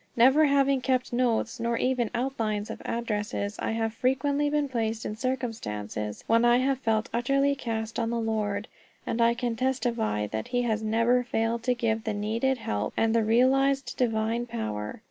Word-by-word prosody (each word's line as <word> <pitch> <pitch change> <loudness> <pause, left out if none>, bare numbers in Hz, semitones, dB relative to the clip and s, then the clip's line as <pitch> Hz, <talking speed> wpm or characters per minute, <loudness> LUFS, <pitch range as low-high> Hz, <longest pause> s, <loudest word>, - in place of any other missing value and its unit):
Never 265 +6 +6
having 275 -1 +3
kept 255 -1 0
notes, 240 -2 0
nor 235 0 0
even 250 -3 0
outlines 225 -5 -2
of - - -8
addresses, 210 -3 -3
I - - -1
have 225 -1 -1
frequently 280 +4 +1
been 295 -1 +1
placed 225 -3 -2
in 210 - -3
circumstances 160 - -4
when 230 +1 +3
I 240 0 +5
have 260 +1 +1
felt 225 -3 0
utterly 275 +4 +2
cast 225 -4 -4
on 230 -1 0
the 235 0 -1
Lord. 215 -2 -1 0.4
And 230 - -1
I 235 0 +4
can 240 -1 -2
testify 235 - 0
that 110 +1 -4
he 245 0 0 0.2
never 230 +3 +2
failed 230 -1 -1
to 250 - +2
give 225 -2 -1
the 220 -2 -2
needed 230 +6 0
help, 105 - -3
and 225 0 +2
the 230 -1 +3
realized 265 +4 +2
divine 230 0 0
power. 105 - -4
230 Hz, 170 wpm, -27 LUFS, 220-255 Hz, 0.4 s, Never